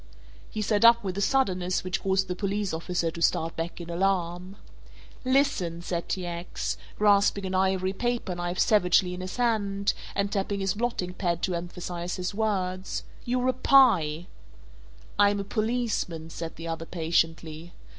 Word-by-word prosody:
He 215 - -3
sat 210 +1 +1
up 235 0 +7
with 185 -2 -3
a - - -1
suddenness 185 -7 +1
which 185 0 -2
caused 190 0 +1
the 180 - -3
police 200 0 -2
officer 165 0 -1
to 170 - -8
start 165 0 +1
back 165 +2 -4
in 170 - -7
alarm. 180 +1 -1 0.7
"Listen," 255 -11 +1
said 170 -1 -3
T. 185 -2 -2
X., 175 0 -3 0.2
grasping 200 -1 +3
an 190 - -3
ivory 190 0 +1
paperknife 185 -6 -2
savagely 180 -3 +3
in 180 - -6
his 185 +4 -6
hand 205 -4 +1 0.2
and 200 0 0
tapping 200 0 -1
his 195 -1 0
blotting 210 -5 -2
pad 175 -2 -1
to 185 - +1
emphasize 175 0 -4
his 180 +2 -3
words, 190 -3 -1 0.2
"you're 250 +1 0
a 255 - +3
pie!" 185 - +4 0.9
"I'm 205 0 +5
a - - -2
policeman," 215 -7 -2
said 165 0 -6
the 165 - -7
other 165 0 -4
patiently. 165 -1 -1
185 Hz, 155 wpm, -27 LUFS, 175-205 Hz, 0.9 s, up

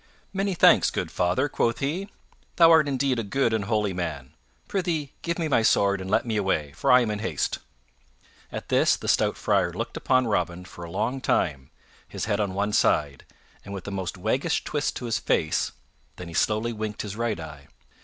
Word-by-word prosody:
"Many 195 -1 -1
thanks, - - +6
good - - -3
father," 90 +11 +1
quoth 115 -4 0
he. 170 +9 -2 0.5
"Thou 165 -1 +7
art 160 -3 +6
indeed 135 -2 0
a - - -1
good 115 +3 0
and 110 -3 0
holy 105 -3 0
man. 80 -7 -5 0.3
Prythee 170 -7 -2
give 170 0 -2
me 165 -2 -1
my 135 -6 +3
sword 100 -3 +3
and 95 - -6
let 105 - +2
me 110 -2 -1
away, 90 -8 0
for 75 - 0
I 125 0 +7
am 115 -3 -1
in 105 - -3
haste." 90 -9 -2 0.9
At - - -7
this - - +4
the - - -8
stout - - +2
Friar - - +1
looked - - -5
upon 130 -1 +2
Robin 90 -4 -1
for 85 - -11
a 85 - -7
long 130 +10 -2
time, 70 - 0 0.4
his - - -4
head 105 -1 0
on 100 -3 -1
one 100 +1 -1
side, 70 -8 +1 0.4
and 100 0 -7
with 95 - -8
a - - -4
most 95 -1 -4
waggish 130 - 0
twist 145 -1 -2
to 125 - -5
his 115 -2 0
face; 80 -5 0 0.4
then 90 - -8
he - - -9
slowly 110 +6 +1
winked 110 -1 -4
his 105 -2 -6
right 115 -5 -1
eye. 75 -3 -10
105 Hz, 205 wpm, -25 LUFS, 90-130 Hz, 0.9 s, Thou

